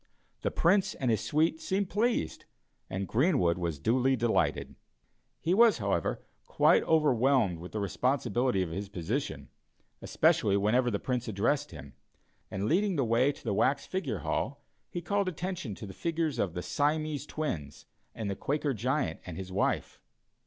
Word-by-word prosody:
The - - 0
Prince 190 +2 +2
and 130 -3 0
his 110 - +1
suite 160 +1 +1
seemed 195 0 -1
pleased, 230 +4 0 0.4
and 95 0 -3
Greenwood 120 - +2
was 85 -4 -2
duly 130 - +2
delighted. 120 -2 0 0.7
He 170 - 0
was, 230 +2 +6
however, 100 -6 -1 0.2
quite - - +4
overwhelmed 130 - +3
with 90 +2 -9
the 110 - -3
responsibility 120 0 0
of 85 - -5
his 100 +3 -4
position, 100 - -3 0.5
especially 100 -1 +2
whenever 120 +5 +2
the 105 - 0
Prince 125 +2 -2
addressed 110 +7 0
him, - - -11 0.6
and 95 +2 -3
leading 190 - +2
the 135 -4 +1
way 120 +5 +3
to - - -15
the 110 - -1
wax 130 +7 +1
figure 140 - -3
hall - - -2 0.3
he 175 - -5
called 200 -2 0
attention 175 - -4
to - - -8
the 95 - -8
figures 160 - -2
of 90 -4 -1
the 90 - -3
Siamese 150 -1 -1
Twins 80 - -4 0.3
and 110 -3 -4
the 100 - -2
Quaker 145 +3 -1
Giant 125 - -1
and 90 -3 -8
his 95 -1 -6
wife. 95 - -1
125 Hz, 160 wpm, -30 LUFS, 100-155 Hz, 0.7 s, was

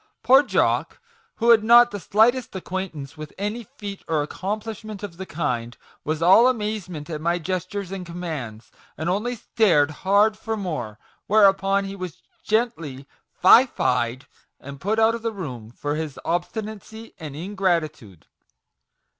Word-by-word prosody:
Poor 265 +2 +7
Jock, 290 - 0 0.4
who 235 0 +3
had 220 -2 +6
not 240 +2 +7
the 205 - -5
slightest 225 +6 +2
acquaint 190 -1 -4
ance 140 +1 -9
with 155 -1 -8
any 210 +4 -3
feat 200 -2 -7
or 155 -2 +1
accomplishment 210 +4 -5
of 185 -5 -7
the 190 0 -7
kind, 120 -7 -3 0.3
was 155 +1 -2
all 195 +8 +7
amazement 210 -10 -3
at 155 -3 -5
my 170 +2 +1
gestures 185 +2 -4
and 195 -1 -5
commands, 160 -11 -6 0.3
and 160 +3 -2
only 230 +6 -1
stared 175 -10 +2
hard 205 +3 +4
for 220 +1 -4
more; 150 - -4 0.3
whereupon 195 -1 +4
he 195 0 -6
was 185 -5 -8 0.2
gently 165 - -2 0.2
' - - -43
fie 240 +8 +8
fad,' 125 - -1 0.3
and 140 +1 -10
put 215 +3 0
out 225 0 +4
of 230 - -5
the 230 0 -2
room 130 - -7
for 145 +5 -4
his 155 -2 -4
obstinacy 220 +5 -4
and 150 -4 -7
ingrati 175 -2 0
tude!" 95 -7 -17
190 Hz, 155 wpm, -23 LUFS, 155-215 Hz, 0.4 s, fie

